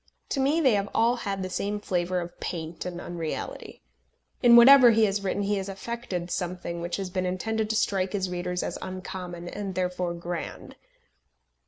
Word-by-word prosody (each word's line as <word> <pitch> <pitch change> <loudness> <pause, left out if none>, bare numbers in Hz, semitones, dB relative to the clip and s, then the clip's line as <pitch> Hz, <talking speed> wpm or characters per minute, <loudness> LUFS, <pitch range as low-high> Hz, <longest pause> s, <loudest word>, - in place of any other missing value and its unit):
To 275 - -1
me 280 +5 +2
they 265 -7 +4
have 200 0 0
all 235 +2 +4
had 195 -4 -3
the 185 - -4
same 205 +2 -2
flavour 180 -2 -1
of 175 0 -9
paint 165 -1 -5
and 175 -1 -5
unreality. 170 -3 -6 0.6
In 240 -2 +7
whatever 250 +1 +9
he 225 -1 +5
has 200 0 -1
written 200 +1 -1
he 205 +1 0
has 195 0 -4
affected 195 -3 -5
something 175 -1 -3
which 175 +1 -2
has 190 -2 -4
been 185 0 -1
intended 220 +4 -1
to 220 - 0
strike 195 -3 0
his 190 -2 0
readers 180 0 -3
as - - -4
uncommon 180 -2 -6
and 195 0 -5
therefore 180 -1 -1
grand. 170 0 -6
185 Hz, 180 wpm, -27 LUFS, 175-210 Hz, 0.6 s, whatever